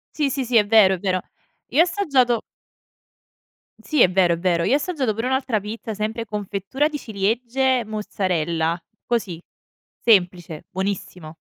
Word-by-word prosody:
Sì, 295 -3 +1
sì, 270 0 -2
sì, 235 -1 +2
è 210 - +5
vero, 205 -3 +5
è - - -10
vero. 185 -2 0 0.5
Io 290 +7 +3
ho - - +8
assaggiato 275 - +1 1.4
Sì, 305 -5 0
è 185 - +6
vero, 180 -2 +3
è - - -2
vero, 170 -2 +1
io 250 - +2
ho - - +6
assaggiato 285 -6 -1
pure 225 +4 -3
un'altra 260 -4 0
pizza, 220 +1 -6
sempre 220 +2 -3
confettura 210 +7 -2
di 300 - -4
ciliegie, 235 +4 0
mozzarella. 170 -6 -1 0.3
Così, 210 -8 -2 0.6
semplice, 175 -7 +2
buonissimo. 185 -4 -4
215 Hz, 150 wpm, -22 LUFS, 185-255 Hz, 1.4 s, ho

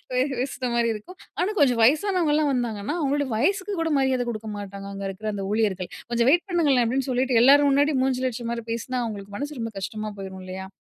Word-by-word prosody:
பே 250 - 0 0.2
பேசுற 265 0 -3
மாதிரி 235 -1 +2
இருக்கும். 220 - -10 0.2
ஆனா 370 - +1
கொஞ்சம் 250 -6 +4
வயசானவங்கலாம் 305 - +3
வந்தாங்கன்னா 235 0 -2
அவங்களோட 285 -2 +1
வயசுக்கு 380 - 0
கூட 330 - 0
மரியாத 265 -2 +2
கொடுக்க 220 -1 -6
மாட்டாங்க, 200 -1 -7
அங்க 195 0 -6
இருக்கிற 200 +3 -5
அந்த 200 -1 -4
ஊழியர்கள்! 200 -5 0 0.2
"கொஞ்சம் 235 +1 +2
வெயிட் 350 +5 +3
பண்ணுங்களேன்!" 290 -8 +3
அப்படின்னு 260 +3 -1
சொல்லிட்டு 250 -1 +2
எல்லாரும் 285 +3 +7
முன்னாடி 285 +2 +3
மூஞ்சில 260 -1 +1
அடிச்ச 235 0 -6
மாதிரி 235 -1 -4
பேசினா, 250 +3 -3
அவங்களுக்கு 205 -3 -6
மனசு 290 +3 -5
ரொம்ப 225 0 -4
கஷ்டமா 215 +2 -4
போயிரும் 190 -1 -7
இல்லையா? 190 +1 -6
245 Hz, 195 wpm, -25 LUFS, 215-285 Hz, 0.2 s, எல்லாரும்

